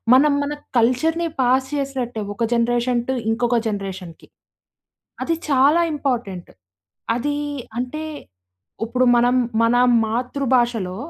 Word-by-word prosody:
మనం 285 +2 +5
మన 285 +1 -3 0.3
కల్చర్‌ని 315 +9 +1
పాస్ 260 +1 +2
చేసినట్టే. 260 -5 -3
ఒక 235 - -2
జనరేషన్ 240 +1 +1
టు - - +2 0.2
ఇంకొక 240 +1 +1
జనరేషన్‌కి. 190 -4 -6 1.0
అది 330 - 0
చాలా 285 +4 +4
ఇంపార్టెంట్. 235 -11 -3 0.7
అదీ 290 +4 -2 0.4
అంటే, 255 +6 -4 0.8
ఉప్పుడు 250 +3 +1
మనం 245 +1 +3 0.3
మన 230 +1 +3 0.3
మాతృభాషలో, 240 -4 0
245 Hz, 105 wpm, -21 LUFS, 230-275 Hz, 1.0 s, మనం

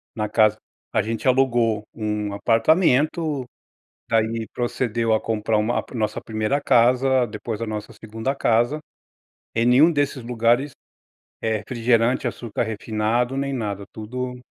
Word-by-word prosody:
Na 105 -2 -1
casa 110 -1 +3 0.4
a - - +3
gente 115 +4 -3
alugou 120 -5 +2
um 105 -2 -3
apartamento, 150 - +2 0.6
daí 115 0 0
procedeu 120 -2 -1
a 110 - +1
comprar 110 -1 0
uma 110 +3 +1
ah, - - -13
nossa 110 -2 -1
1ª 110 +6 -1
casa, 125 +1 +3
depois 105 +1 -6
a 115 - -2
nossa 105 -1 -5
2ª 115 +5 -4
casa. 120 +3 +2 0.8
Em 115 - +2
nenhum 135 +7 +6
desses 145 -4 -1
lugares, 120 +4 +1 0.7
eh, 110 -1 0
refrigerante, 115 +2 +1
açúcar 115 -2 -3
refinado, 110 +3 -1
nem 140 0 -1
nada, 100 -5 -3
tudo 125 +3 -5
115 Hz, 130 wpm, -23 LUFS, 110-125 Hz, 0.8 s, nenhum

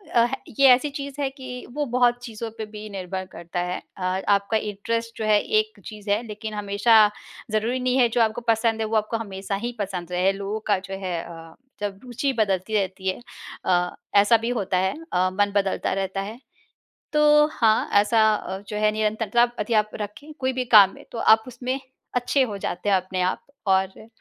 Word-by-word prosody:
अ, - - +6
है 240 +3 +1 0.2
ये 275 - +8
ऐसी 255 +4 +5
चीज़ 280 0 -7
है 275 - +1
कि 260 -2 -8
वो 295 0 -1
बहुत 245 -1 +4
चीज़ों 230 -1 -6
पे 220 - -4
भी 215 0 -8
निर्भर 190 -1 -5
करता 170 +1 -6
है। 180 +1 -2 0.2
अ, - - -10 0.3
आपका 200 +2 +3
इंटरेस्ट 230 +2 -3
जो 220 - -2
है 210 -1 +5 0.2
एक 430 0 -4
चीज़ 210 -2 -9
है, 205 +2 +2
लेकिन 215 +1 -6
हमेशा 205 +2 +2 0.6
ज़रूरी 225 +4 0
नहीं 255 0 +1
है 250 -2 +5
जो 240 - +4
आपको 220 +1 +1
पसंद 225 0 +2
है, 220 - 0
वो 225 - -2
आपको 215 +2 -1
हमेशा 195 -2 -4
ही 240 - -2
पसंद 180 -3 -4
रहे। 180 +2 +2
लोगों 200 +2 -4
का 200 - +5
जो 195 - -6
है 180 -2 -2
अ, 165 -1 -11 0.3
जब 200 -1 -3
रुचि 250 +2 -2
बदलती 205 -2 0
रहती 190 -1 -1
है 185 - -1 0.5
अ, 180 -1 +1 0.2
ऐसा 205 +3 +6
भी 230 +2 -3
होता 190 -2 0
है 190 +1 +1 0.2
अ, 185 +1 +3
मन 205 +1 +1
बदलता 195 -1 0
रहता 195 0 -2
है। 215 +4 -7 0.7
तो 300 0 +6
हाँ, 220 -5 +2
ऐसा 220 +2 +4
अ, 190 -2 -5
जो 210 - -3
है 215 0 +3
निरंतरता 215 +2 +1 0.2
यदि 210 +2 -1
आप 215 -1 +3
रखें 245 +10 -7
कोई 260 0 0
भी 255 0 -2
काम 195 -2 +8
में, - - -13
तो - - -7
आप 220 -1 +5
उसमें 255 +2 -3 0.4
अच्छे 250 +3 +2
हो 215 -5 -3
जाते 195 0 -3
हैं 200 - +5
अपने 185 0 -1
आप, 180 +1 -1 0.2
और 190 0 +4
अ, 220 - -13
215 Hz, 205 wpm, -24 LUFS, 195-240 Hz, 0.7 s, ये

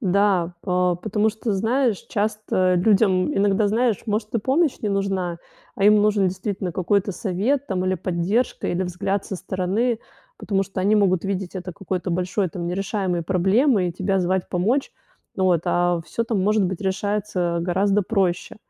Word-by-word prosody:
Да, 190 -4 +2
па 180 -2 +1
потому 210 +3 0
что, 220 0 -3
знаешь, 225 +1 +1
часто 205 -3 0
людям 190 -1 +3
иногда, 200 +1 +2
знаешь, 230 0 +1
может 210 +1 -2
и - - +3
помощь 275 +7 +1
не 210 - 0
нужна, 195 -3 -1 0.4
а 195 - -1
им 210 +1 +7
нужен 205 -3 +3
действительно 190 -1 -4
какой-то 200 +3 +1
совет, 230 +9 -1
там 185 -1 -2
или 185 - +1
поддержка, 185 +8 -1
или 180 +2 0
взгляд 185 +2 -2
со 190 - -5
стороны. 200 +7 -1 0.4
Потому 195 -2 -1
что 195 -1 -5
они 205 +3 +3
могут 190 -3 +2
видеть 195 -1 -3
это 180 -1 -5
какой-то 185 0 -4
большой 180 +2 -1
там 170 +1 -5
нерешаемой 185 -1 -2
проблемой 190 - +2
и 170 - -4
тебя 190 +2 0
звать 185 +1 0
помочь. 225 +10 0 0.5
Вот. 185 -3 +2
А 175 -1 +1
всё 230 - -3
там, 220 -5 -1
может 210 0 +2
быть, 185 0 -3
решается 190 -3 -1
гораздо 195 +4 +1
проще. 185 -3 -1
195 Hz, 165 wpm, -23 LUFS, 180-210 Hz, 0.5 s, им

